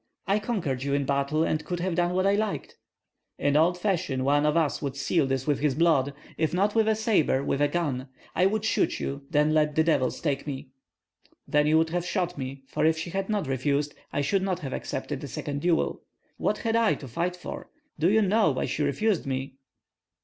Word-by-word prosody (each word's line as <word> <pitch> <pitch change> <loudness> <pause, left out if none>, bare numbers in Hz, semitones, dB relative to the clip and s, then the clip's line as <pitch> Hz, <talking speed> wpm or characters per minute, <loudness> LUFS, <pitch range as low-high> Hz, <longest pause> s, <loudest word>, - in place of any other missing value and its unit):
I 200 +1 +2
conquered 185 - -2
you 140 +1 0
in 140 -1 0
battle, 140 +3 +1
and 155 - 0
could 175 -1 -4
have 180 0 -1
done 175 +1 +1
what 185 +1 +2
I 200 - +4
liked." 210 0 -2 0.6
"In 145 0 +1
old 170 +4 +4
fashion 175 -9 -1
one 145 +2 +3
of 150 +2 +2
us 160 -4 +1
would 140 -2 -3
seal 140 +2 +1
this 135 -1 -1
with 145 -2 +1
his 145 -3 +1
blood, 145 -4 +2 0.2
if 160 +1 +1
not 200 +3 +2
with 225 -1 +3
a 220 - +3
sabre, 210 - +2
with 140 - -1
a 145 - +5
gun. 145 -5 -2 0.3
I 185 - +4
would 215 +2 -1
shoot - - +1
you; 140 +1 -3
then 150 -1 +3
let 150 -1 +2
the 160 - +4
devils 140 -6 +1
take 145 -2 -2
me." 135 -1 -5 0.8
"Then 150 0 +3
you 155 +1 +4
would 160 0 +2
have 175 0 -1
shot 180 0 -1
me, 135 -1 -6
for - - -2
if 160 0 +3
she 165 +2 -5
had 195 +2 -2
not 210 -4 0
refused 140 +2 0 0.2
I 145 - 0
should 185 +7 +1
not 185 -2 -1
have 135 -4 -5
accepted - - -4
a - - -4
second 145 0 -4
duel. 170 0 +1 0.4
What - - 0
had 225 -1 -1
I 230 -2 +3
to 140 - -9
fight 170 +9 -2
for? 180 - -8 0.3
Do 165 +4 +4
you 220 +2 +4
know 205 0 +3
why 130 - -1
she - - -2
refused 170 +5 +1
me?" 135 0 -3
155 Hz, 220 wpm, -27 LUFS, 140-185 Hz, 0.8 s, a